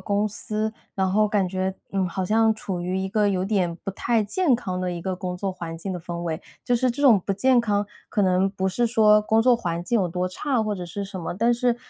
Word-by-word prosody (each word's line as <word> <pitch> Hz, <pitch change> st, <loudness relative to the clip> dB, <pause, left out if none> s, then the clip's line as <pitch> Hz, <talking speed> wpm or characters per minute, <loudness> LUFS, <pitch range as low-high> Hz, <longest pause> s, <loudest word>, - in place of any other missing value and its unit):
公 205 Hz, +1 st, 0 dB
司， 215 Hz, +1 st, -3 dB, 0.2 s
然 190 Hz, -1 st, +1 dB
后 210 Hz, +2 st, +3 dB
感 200 Hz, -3 st, +1 dB
觉， 185 Hz, +1 st, -1 dB, 0.2 s
呃， 195 Hz, -1 st, +1 dB
好 185 Hz, +1 st, -2 dB
像 220 Hz, +3 st, +3 dB
处 195 Hz, -4 st, -5 dB
于 180 Hz, +2 st, -2 dB
一 190 Hz, 0 st, -2 dB
个 210 Hz, +1 st, +2 dB
有 185 Hz, -2 st, 0 dB
点 190 Hz, -4 st, 0 dB
不 195 Hz, -, -3 dB
太 225 Hz, +2 st, +1 dB
健 275 Hz, -, +2 dB
康 185 Hz, -6 st, -4 dB
的 180 Hz, -, -1 dB
一 175 Hz, -1 st, -4 dB
个 185 Hz, +1 st, -2 dB
工 180 Hz, -1 st, -4 dB
作 195 Hz, +1 st, -2 dB
环 165 Hz, -2 st, -7 dB
境 190 Hz, +3 st, -4 dB
的 180 Hz, -, -5 dB
氛 175 Hz, +1 st, -7 dB
围。 165 Hz, 0 st, -3 dB, 0.2 s
就 245 Hz, -, +2 dB
是 250 Hz, +1 st, +2 dB
这 250 Hz, +4 st, -5 dB
种 240 Hz, -9 st, +6 dB
不 200 Hz, -, 0 dB
健 245 Hz, +5 st, +3 dB
康， 205 Hz, -3 st, 0 dB, 0.2 s
可 210 Hz, -, 0 dB
能 185 Hz, +1 st, +2 dB
不 190 Hz, -1 st, -1 dB
是 235 Hz, +5 st, +1 dB
说 215 Hz, -2 st, +5 dB
工 220 Hz, +1 st, +3 dB
作 250 Hz, +2 st, +5 dB
环 175 Hz, -7 st, -3 dB
境 230 Hz, +4 st, +1 dB
有 180 Hz, -, 0 dB
多 180 Hz, +2 st, -1 dB
差 260 Hz, +6 st, -1 dB
或 215 Hz, -1 st, -1 dB
者 180 Hz, -3 st, -6 dB
是 190 Hz, +4 st, -5 dB
什 195 Hz, -1 st, -7 dB
么。 165 Hz, -, -4 dB
但 230 Hz, +6 st, +2 dB
是 240 Hz, 0 st, +1 dB
200 Hz, 275 characters per minute, -24 LUFS, 185-220 Hz, 0.2 s, 种